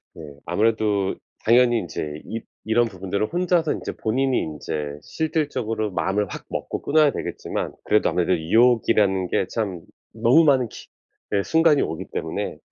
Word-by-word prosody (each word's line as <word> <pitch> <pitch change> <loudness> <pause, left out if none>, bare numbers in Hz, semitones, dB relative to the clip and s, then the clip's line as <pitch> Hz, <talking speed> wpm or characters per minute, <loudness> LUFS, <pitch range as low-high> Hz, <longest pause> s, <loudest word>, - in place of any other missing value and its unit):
네. 75 -3 -10
아무래도 105 +1 +1 0.3
당연히 120 +1 +4
인제 75 -5 -5
입 115 0 -6 0.2
이런 115 +2 +3
부분들을 100 +1 -3
혼자서 175 -3 +2
인제 - - -5
본인이 130 +4 +1
인제 75 -1 -4
실질적으로 130 - -2
마음을 100 +3 0
확 - - -8
먹고 - - -4
끊어야 150 0 +4
되겠지만 - - -4
그래도 105 - +3
아무래도 90 +1 +1
유혹이라는 105 0 +3
게 95 - 0
참 100 -6 -3 0.3
너무 120 +8 +5
많은 130 -6 +3
기 - - -12 0.5
예 100 - +3
순간이 160 +3 +3
오기 80 - -3
때문에 - - -3
110 Hz, 345 characters per minute, -23 LUFS, 95-130 Hz, 0.5 s, 너무